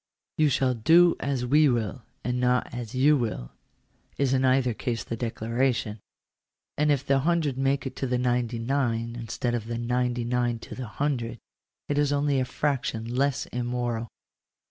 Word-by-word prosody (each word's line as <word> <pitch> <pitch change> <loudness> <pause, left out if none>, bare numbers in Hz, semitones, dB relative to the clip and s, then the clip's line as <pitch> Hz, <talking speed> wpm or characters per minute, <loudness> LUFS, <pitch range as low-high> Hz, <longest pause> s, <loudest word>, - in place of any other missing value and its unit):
" - - -24
Tou 155 -1 +5
shall 130 -1 +2
do 165 +9 +5
as 135 -3 -1
we 150 +3 +5
will, 120 +1 -1 0.2
and 125 0 -1
not 125 -1 +1
as 120 -1 -6
you 145 +4 +5
will," 110 - -3 0.7
is 135 -2 +1
in 130 0 +2
either 130 -2 +3
case 115 0 -3
the 115 - -4
declaration; 115 -1 -1 0.8
and 150 0 +2
if 140 -1 +1
the 140 0 +3
hundred 155 -2 +1
make 135 +1 0
it 130 -1 -5
to 135 - -2
the 125 0 +1
ninety 120 -1 0
nine, 115 -2 -1
instead 120 +1 -3
of 115 -2 -2
the 115 0 -3
ninety 120 0 0
nine 120 0 0
to 115 - -10
the 130 -2 -6
hundred, 120 -2 -2 0.5
it 145 0 0
is 145 -1 +2
only 145 -1 +2
a 130 - +1
fraction 125 -4 -2
less 140 0 +1
immoral. 120 -1 -2
125 Hz, 175 wpm, -26 LUFS, 120-140 Hz, 0.8 s, Tou